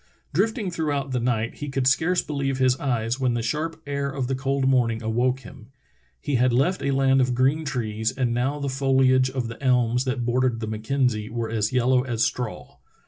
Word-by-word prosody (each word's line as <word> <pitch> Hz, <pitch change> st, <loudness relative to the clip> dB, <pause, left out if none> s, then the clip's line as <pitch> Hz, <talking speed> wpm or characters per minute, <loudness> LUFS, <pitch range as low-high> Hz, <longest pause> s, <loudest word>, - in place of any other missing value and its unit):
Drifting 205 Hz, -, 0 dB
throughout 145 Hz, -5 st, -2 dB
the 125 Hz, -, 0 dB
night, 115 Hz, -1 st, -1 dB
he 145 Hz, -, -5 dB
could 135 Hz, -1 st, -1 dB
scarce 160 Hz, +7 st, +2 dB
believe 140 Hz, -2 st, -2 dB
his 130 Hz, -1 st, +3 dB
eyes 120 Hz, -2 st, -1 dB
when 125 Hz, -2 st, +1 dB
the 115 Hz, -, -2 dB
sharp 155 Hz, +7 st, -2 dB
air 140 Hz, 0 st, -2 dB
of 135 Hz, -2 st, -3 dB
the 135 Hz, -, -2 dB
cold 135 Hz, 0 st, 0 dB
morning 120 Hz, -4 st, +2 dB
awoke 125 Hz, +4 st, 0 dB
him. 115 Hz, -1 st, -13 dB, 0.6 s
Ke 145 Hz, -3 st, +1 dB
had 125 Hz, 0 st, +3 dB
left 140 Hz, +10 st, +1 dB
a 140 Hz, -, -1 dB
land 135 Hz, -1 st, +3 dB
of 125 Hz, -1 st, +1 dB
green 135 Hz, +5 st, +2 dB
trees 110 Hz, -4 st, -2 dB
and 125 Hz, -3 st, -1 dB
now 130 Hz, +5 st, 0 dB
the 140 Hz, -1 st, -3 dB
foliage 130 Hz, -1 st, +3 dB
of 130 Hz, -2 st, -3 dB
the 115 Hz, +3 st, -9 dB
elms 125 Hz, -1 st, +2 dB
that 130 Hz, -2 st, -2 dB
bordered 125 Hz, -1 st, +1 dB
the 110 Hz, -, -3 dB
Mackenzie 110 Hz, 0 st, -1 dB
were 115 Hz, -1 st, -3 dB
as 110 Hz, -2 st, 0 dB
yellow 125 Hz, 0 st, +3 dB
as 120 Hz, -3 st, -1 dB
straw. 125 Hz, -3 st, -3 dB
130 Hz, 200 wpm, -24 LUFS, 120-140 Hz, 0.6 s, his